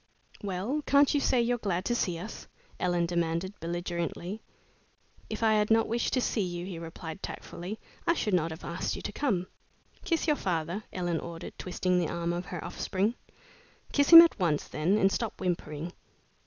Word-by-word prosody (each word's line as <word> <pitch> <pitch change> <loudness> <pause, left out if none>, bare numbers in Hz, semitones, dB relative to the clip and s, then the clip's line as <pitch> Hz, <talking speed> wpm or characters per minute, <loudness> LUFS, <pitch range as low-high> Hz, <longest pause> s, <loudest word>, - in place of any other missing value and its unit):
"Well, 205 +9 -2
can't 280 0 +5
you 290 - +3
say 250 -3 +3
you're 240 +1 0
glad 190 -3 -1
to 240 - +1
see 180 -7 0
us?" 215 +6 -8 0.3
Ellen 175 -1 +1
demanded, 170 +2 -1
belligerently. 175 +3 -3 0.9
"If 220 +1 -4
I 220 -1 +5
had 210 -1 +2
not 225 0 +4
wished 235 +1 0
to 255 - +2
see 225 - 0
you," 175 -2 -3
he 180 -3 -6
replied, 165 +1 -7
tactfully, 185 +5 -6 0.3
"I 335 - +4
should 210 -9 -1
not 165 -2 +2
have 160 +1 -8
asked - - -2
you - - -8
to - - -3
come." 200 -11 0 0.6
"Kiss 330 -3 0
your 300 -2 +2
father," 175 +3 -2
Ellen 175 -3 -1
ordered, 170 0 -7
twisting 180 0 0
the 170 -3 0
arm 170 0 -1
of 175 +1 -3
her 175 -3 -5
offspring. 195 +4 -1 0.8
"Kiss 285 -1 +3
him 335 0 +13
at 335 - +1
once, 160 -5 +1
then, 175 +7 +1
and 195 -2 +4
stop 220 +3 -2
whimpering." 170 -2 -3
185 Hz, 180 wpm, -29 LUFS, 170-220 Hz, 0.9 s, him